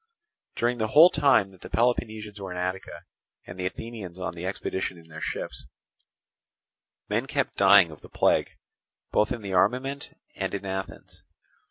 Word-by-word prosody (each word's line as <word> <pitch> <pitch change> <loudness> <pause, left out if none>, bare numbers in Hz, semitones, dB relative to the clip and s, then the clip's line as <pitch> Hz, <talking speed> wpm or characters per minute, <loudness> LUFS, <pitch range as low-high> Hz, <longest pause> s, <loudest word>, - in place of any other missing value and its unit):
During 120 +1 0
the 110 - +1
whole 160 +10 +8
time 135 -9 +3
that 95 - -19
the - - -9
Peloponnesians 110 -3 -1
were 95 - -5
in 90 - -5
Attica 90 +1 -4 0.4
and 90 +1 -10
the 90 - 0
Athenians 100 -3 -7
on 95 -3 -4
the 85 +2 -5
expedition 95 -1 -3
in 80 -1 -17
their 80 -1 -9
ships, - - -5 1.4
men 115 +5 -1
kept 140 -1 -1
dying 95 -3 +6
of 75 - -13
the - - -14
plague - - +2 0.6
both 105 - +2
in 120 -4 -3
the 100 -1 -4
armament 130 +9 0 0.2
and - - -3
in 100 0 -5
Athens. 95 0 -6
100 Hz, 165 wpm, -26 LUFS, 95-120 Hz, 1.4 s, whole